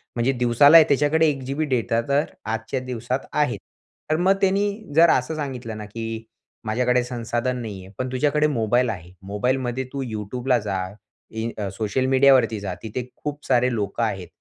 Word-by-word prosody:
म्हणजे 120 +2 +2
दिवसाला 130 +6 +7
त्याच्याकडे 145 +3 +3
1 140 -2 -3
जीबी 140 +4 -2
डेटा 115 -4 0
तर 145 +2 +3 0.2
आजच्या 115 +4 -2
दिवसात 125 -3 -3
आहे. - - +1 0.5
तर - - +4
मग 185 +3 +4
त्यांनी 200 +1 +2 0.3
जर 165 +1 +7
असं 130 +4 +1
सांगितलं 125 -7 -5
ना, 105 - -6
की 115 +1 -5 0.4
माझ्याकडे 125 +3 +1
संसाधन 120 +1 -2
नाही 100 -4 -7
आहे. 95 - -15
पण 130 0 -3
तुझ्याकडे 150 +3 +2
मोबाईल 120 -2 +1
आहे. 90 -4 -6
मोबाईलमध्ये 125 +5 -1
तू 140 - -3
YouTubeला 120 +3 -1
जा, 95 -2 -1 0.5
इ 110 +1 -3
अ, 100 -2 -3
सोशल 110 +4 0
मीडियावरती 130 -4 +4
जा. 100 -2 -4
तिथे 115 +3 -4
खूप 150 0 -6
सारे 125 -1 +2
लोकं 105 +1 -2
आहेत 95 -5 -2
125 Hz, 165 wpm, -23 LUFS, 110-135 Hz, 0.5 s, दिवसाला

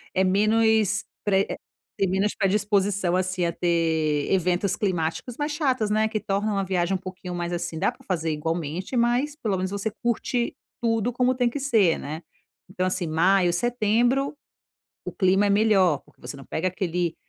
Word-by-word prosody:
É 190 - +3
menos 215 +1 +3 0.2
pre 195 -1 +2
eh, - - -4 0.4
tem 195 - +2
menos 195 +3 0
predisposição, 200 -2 +1
assim, 185 -1 0
a 170 - 0
ter 160 -4 0
eventos 185 +1 +1
climáticos 185 +4 -2
mais 295 0 -2
chatos, 260 -8 0
né, 215 +1 +2
que 220 -1 -2
tornam 205 +1 -1
a - - 0
viagem 185 -1 0
um - - +1
pouquinho 185 -1 -7
mais 175 0 -3
assim 170 -2 -3
dá - - +2
para - - -20
fazer 165 -4 -1
igualmente, 165 - -3
mas 245 +5 +1
pelo 215 -10 -2
menos 185 +1 -2
você 200 +2 -2
curte 240 +1 -1 0.3
tudo 225 0 +1
como 250 +1 +2
tem 245 -1 +2
que 285 - -5
ser, 220 -11 +3
né. 155 +3 -6 0.5
Então 185 -1 -2
assim, 185 -1 -1
maio, 175 +3 +3
setembro, 240 - +1 0.7
o - - -4
clima 190 +1 +3
é - - 0
melhor, 200 -7 +3
porque - - -25
você - - -7
não 135 - -12
pega 170 +4 -2
aquele, 175 -2 -2
195 Hz, 175 wpm, -25 LUFS, 175-220 Hz, 0.7 s, É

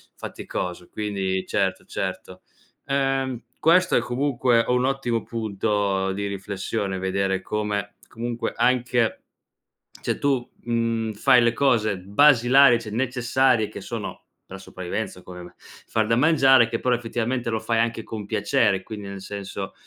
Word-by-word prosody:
faticoso 90 -1 -6
quindi 95 -3 -2
certo, - - -1
certo. - - -5 0.4
Ehm, 135 -3 -1 0.2
questo 180 +3 +4
è - - +5
comunque 125 -2 +1
un 125 +1 +2
ottimo 130 -4 -1
punto 100 -3 -1
di 100 +1 -3
riflessione: 100 0 -3
vedere 95 0 -1
come 105 -1 -3
comunque 120 +1 -4
anche 125 -2 +1 0.8
cioè, - - -1
tu, 135 -4 0
mhmm, 115 -1 -1
fai 120 +4 +4
le 120 - +3
cose 110 -7 +2
basilari, 120 +3 +5
cioè 110 - -8
necessarie, 125 0 +1
che - - -9
sono - - -6 0.3
per 95 - -8
la - - -13
sopravvivenza, 90 -2 -5
come 90 -1 -10
me: 90 - -12
far 110 -1 -4
da 115 - +2
mangiare, 135 -3 +5
che 115 - -2
però 125 -1 +1
effettivamente 120 +1 -2
lo 110 -1 -1
fai 115 0 0
anche 115 0 0
con 105 -2 -6
piacere 100 -2 +1
quindi, 105 -2 -8
nel 100 -1 -7
senso, 100 -1 -6
115 Hz, 140 wpm, -24 LUFS, 100-125 Hz, 0.8 s, è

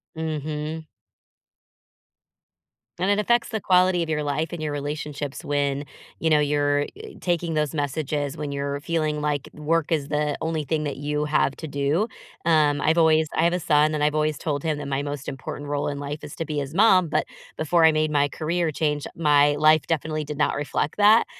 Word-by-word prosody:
Mhm. 155 0 -4 2.1
And 185 +3 0
it 205 +1 +3
affects 235 +3 +2
the 220 -3 -3
quality 180 -1 +3
of 160 - -6
your 150 -1 0
life 150 +2 -1
and 170 -2 -5
your 150 -1 -2
relationships 145 -1 -5
when, 145 0 0 0.3
you 160 - +1
know, 150 -1 +5
you're, 145 0 +2 0.2
eh, 435 -2 -10
taking 170 -2 -1
those 150 0 0
messages 145 0 -2
when 150 -2 -4
you're 140 0 -3
feeling 155 -2 -1
like 145 -2 -1
work 155 +1 0
is 145 -3 0
the 150 0 0
only 160 -2 -2
thing 155 0 -1
that 140 -2 -3
you 150 +1 -2
have 150 -2 +1
to 160 - -6
do. 145 +9 0 0.4
Um, 150 -3 +3
I've 160 +2 +2
always 160 -1 +4
I 160 - +3
have 170 - +3
a 180 - 0
son, 150 -1 +3
and 150 - -1
I've 150 0 +2
always 155 0 +1
told 145 -2 -3
him 155 -2 0
that 140 - -5
my 140 0 -1
most 145 -1 -5
important 145 +2 -7
role 145 0 -1
in 145 -1 -3
life 145 +1 -5
is 145 - -8
to 165 - -3
be 150 -1 -4
his 140 +1 -3
mom, 190 -3 +5
but - - 0 0.3
before 160 +1 +3
I 160 - +6
made 155 0 +1
my 145 -1 +3
career 165 +3 -1
change, 150 -1 -1
my 145 -2 +4
life 155 0 +5
definitely 155 -1 -1
did 150 -1 -6
not 150 - +1
reflect 145 +3 -2
that. 210 +2 +6
150 Hz, 200 wpm, -24 LUFS, 145-160 Hz, 2.1 s, I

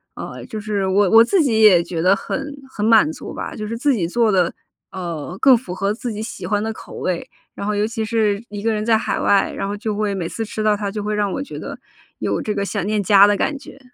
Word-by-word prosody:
呃， - - -7
就 220 - -6
是 205 -2 -2
我 195 +1 +3
我 225 +3 +8
自 355 +10 +2
己 230 -7 +2
也 195 -6 +7
觉 170 -1 -4
得 185 +3 +5
很 285 +1 -4 0.2
很 210 -4 -3
满 220 -8 +5
足 - - -8
吧， - - -6
就 215 - -5
是 230 +2 -4
自 280 +4 +2
己 195 -9 0
做 225 +6 +1
的， 180 -4 +2 0.4
呃， 175 -2 -5
更 265 -2 +6
符 210 -7 -7
合 195 +2 -1
自 235 +2 -5
己 215 0 -5
喜 215 -4 -6
欢 205 +3 0
的 220 +1 -2
口 - - -12
味。 180 -2 -3 0.3
然 - - -5
后 210 - 0
尤 205 +1 +1
其 225 0 -3
是 215 -1 0
一 205 0 -6
个 225 +1 +1
人 215 0 -2
在 225 -1 +4
海 - - -2
外， 200 -1 +2
然 - - -3
后 200 +1 -3
就 215 0 -3
会 210 -1 -1
每 180 -4 -3
次 225 - -4
吃 215 0 -5
到 215 -1 +3
它 205 -1 -3
就 210 +1 -4
会 210 +1 -2
让 205 -1 0
我 275 - -3
觉 280 - -7
得 - - -7 0.4
有 - - -1
这 210 - -2
个 200 -1 -2
想 200 -2 -3
念 210 0 0
家 200 0 +7
的 205 0 +2
感 290 - -1
觉。 270 - -13
210 Hz, 290 characters per minute, -20 LUFS, 195-225 Hz, 0.4 s, 我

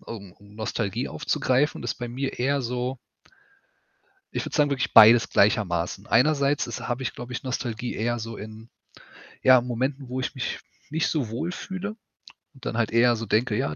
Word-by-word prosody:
um 100 -5 -9
um 100 0 -19
Nostalgie 105 -2 -2
aufzugreifen, 130 +4 0
ist - - -2
bei 120 - -5
mir 130 +2 -4
eher 135 +2 +1
so 125 +2 -3 1.4
ich - - -2
würde - - -5
sagen, 150 -2 +3
wirklich 135 -3 -1
beides 115 +2 +8
gleichermaßen. 100 -2 +1
Einerseits 140 +2 +3
ist 120 - -5
habe 120 +2 -2
ich, 115 - -3
glaube 120 +1 -8
ich, 120 - -5
Nostalgie 125 -2 -3
eher 120 +2 -1
so 115 0 -6
in, 110 +2 -10 0.7
ja, 130 -1 +7
Momenten, 130 +3 -3
wo 130 +1 -3
ich 130 - -3
mich 130 - -3 0.3
nicht 160 +2 0
so 140 -8 -1
wohlfühle 180 - -4 0.6
und 135 - -16
dann 115 - -2
halt 110 -2 +1
eher 120 +1 +4
so 115 0 -5
denke, 110 +1 +1
ja, 75 - -1
120 Hz, 175 wpm, -25 LUFS, 110-130 Hz, 1.4 s, beides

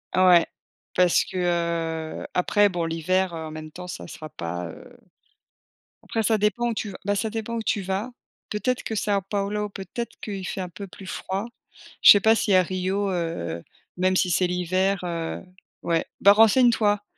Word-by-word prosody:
Ouais. 180 -2 +6 0.5
Parce 180 -2 +4
que, - - -7 0.9
heu, - - -7
après 205 +3 +3
bon 175 -3 -2
l'hiver, 180 +3 0
heu, - - -5
en - - -8
même 155 0 -8
temps, 180 +2 -9
ça - - -7
sera 155 -2 -9
pas, 90 - -5
heu, 80 - -12 1.1
après 225 - -2
ça 220 +1 +3
dépend 210 +3 +1
où - - -1
tu 210 -2 -4
v - - -10
bah, 205 +1 +1
ça 220 - -1
dépend 225 +1 -4
où 225 - -3
tu 205 - 0
vas. 195 +6 -3 0.4
Peut-être 250 +4 -1
que 220 - -4
Sao 205 -1 +1
Paulo, 210 +1 -1
peut-être 200 +5 -6
qu'il 195 -3 -5
fait 190 - -4
un 180 - -5
peu 200 +3 -8
plus 195 +1 -12
froid. 190 +2 -4 0.6
Je - - +11
sais 205 - +7
pas 220 +2 +5
si 210 - +1
à 185 - +6
Rio, 190 +2 -1
heu, 165 - -3 0.4
même 185 +1 +2
si 180 -1 +2
c'est 180 +2 +2
l'hiver, 185 +2 0
heu, 170 -2 -3 0.4
ouais. 165 -1 +1 0.2
Bah, 200 - +8
renseignes 225 +4 +6
toi. 205 -2 +1
190 Hz, 190 wpm, -24 LUFS, 175-210 Hz, 1.1 s, Je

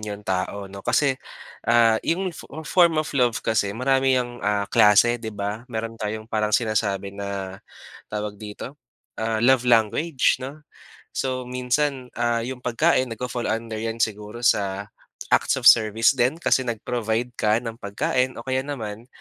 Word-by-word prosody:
yung 105 -1 -6
tao 95 +2 -2
'no 100 0 -9
kasi, 135 +4 +1 0.5
ah, 115 -1 +5
yung 185 +1 -1
fo - - -11 0.2
form 170 +1 +4
of 155 0 -1
love 125 -4 +2
kasi 105 -2 0
marami 135 +1 +2
yang, 120 -1 -3
ah, 105 0 0
klase, 115 +4 +4
di 110 - -5
ba? 105 +3 -5
Meron 115 -1 -5
tayong 110 +1 -3
parang 105 -1 +1
sinasabi 100 -4 -1
na 100 -1 -5 0.5
tawag 105 -1 -5
dito, 110 +7 -8 0.4
ah, 110 0 0
love 125 -1 +4
language 125 +6 +2
'no. 140 +4 -8 0.5
So, 130 -1 -2
minsan, 125 +1 -1
ah, 120 -1 0
yung 130 +1 -5
pagkain 130 +3 +2
nagfa-fall 120 +1 -4
under 110 0 -3
yan 115 +1 -1
siguro 105 +2 -4
sa, 100 -2 +1 0.4
acts - - +3
of - - -5
service 110 0 +6
din 130 +1 +1
kasi 165 - +2
nag-provide 115 +1 -2
ka 105 0 +3
ng 115 -1 -6
pagkain 125 +5 -1
o 115 - -8
kaya 130 +1 0
naman, 115 -5 -6
115 Hz, 155 wpm, -23 LUFS, 105-125 Hz, 0.5 s, service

